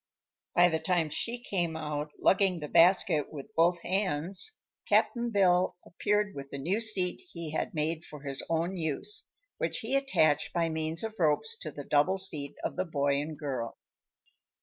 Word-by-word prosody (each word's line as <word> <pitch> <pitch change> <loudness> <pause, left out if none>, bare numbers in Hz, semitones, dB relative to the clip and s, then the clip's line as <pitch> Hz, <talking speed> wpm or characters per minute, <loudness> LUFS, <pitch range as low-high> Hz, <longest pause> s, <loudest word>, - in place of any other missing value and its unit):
By 175 0 +7
the 160 -1 0
time 170 -4 +1
she 240 +8 -3
came 175 -7 -1
out, 150 -1 -3
lugging 190 -2 +3
the 150 - -5
basket 170 -2 +4
with 150 +8 -9
both 170 +1 +3
hands, 190 - 0 0.3
Cap'n 240 -2 +2
Bill 185 -4 +3
appeared 210 +2 0
with 140 0 -8
the 140 - -6
new 175 +10 0
seat 200 - +1
he 165 -2 -5
had 155 - -2
made 160 +2 -1
for 150 -3 -11
his 135 -2 -3
own 165 +3 0
use, 160 - -2 0.3
which - - -1
he 245 +4 -1
attached 160 - +2
by 165 -1 +1
means 160 +2 -2
of 220 -1 -5
ropes 150 -2 +1
to - - -5
the 145 -1 -8
double 150 +8 +2
seat 150 -7 -1
of - - -3
the 185 - 0
boy 140 -3 +1
and 155 0 -6
girl. 130 -6 -4
165 Hz, 170 wpm, -30 LUFS, 150-190 Hz, 0.3 s, By